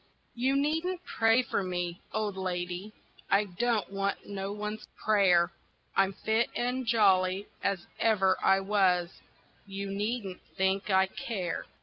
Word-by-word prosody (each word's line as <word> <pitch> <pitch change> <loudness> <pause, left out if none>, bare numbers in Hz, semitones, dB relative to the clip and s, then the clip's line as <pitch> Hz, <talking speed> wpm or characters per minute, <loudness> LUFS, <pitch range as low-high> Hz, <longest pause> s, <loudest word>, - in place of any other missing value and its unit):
You 260 +3 +1
needn't 325 +6 0
pray 225 +3 +3
for - - -1
me, 175 -1 -3
old 210 -2 -2
lady, 180 +1 -3 0.4
I 200 +1 +4
don't 210 +2 -1
want 195 0 -2
no 195 -1 -4
one's 210 +1 -5
prayer, 180 -5 +4 0.4
I'm 195 0 +3
fit 220 +4 0
and 250 +1 -1
jolly 195 -3 +3 0.2
as 195 -3 -1
ever 195 -4 +3
I 195 0 +4
was 190 -3 +1 0.5
you 195 0 -5
needn't 205 -1 -3 0.2
think 190 +2 +1
I 190 -1 +5
care. 190 -2 -4
200 Hz, 130 wpm, -29 LUFS, 190-220 Hz, 0.5 s, I